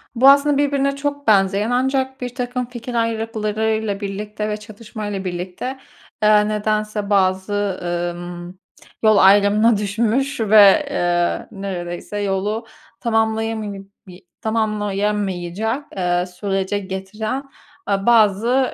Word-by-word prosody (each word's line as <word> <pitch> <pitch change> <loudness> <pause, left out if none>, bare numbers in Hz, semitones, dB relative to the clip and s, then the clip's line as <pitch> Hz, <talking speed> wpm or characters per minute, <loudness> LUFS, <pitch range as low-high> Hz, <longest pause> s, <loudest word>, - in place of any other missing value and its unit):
Bu 260 +3 +7
aslında 285 +1 +5
birbirine 280 -1 +1
çok 285 0 -4
benzeyen 200 +1 +3
ancak 265 +1 0
birtakım 250 0 -3
fikir 245 0 -8
ayrılıklarıyla 220 -2 -1
birlikte 210 +1 -4
ve 210 - -2
çatışmayla 210 -2 -7
birlikte, 185 +9 -5 0.4
eee, 210 0 +5
nedense 215 -1 -1
bazı, 195 0 +1 0.4
ımm, 175 +1 -8 0.4
yol 215 -1 +5
ayrımına 205 +3 +5
düşmüş 230 +7 0
ve, 210 +5 +6
eee, 175 -8 0
neredeyse 190 -1 -5
yolu 205 +3 -1 0.3
tamamlayama 225 -1 0 0.4
bi 180 0 -14
tamamlayamayacak, 210 0 -1
eee, 180 -1 +1
sürece 195 +2 -2
getiren, 205 +6 -4 0.5
eee, 195 -1 0
bazı 235 +3 +3
210 Hz, 105 wpm, -20 LUFS, 195-230 Hz, 0.5 s, Bu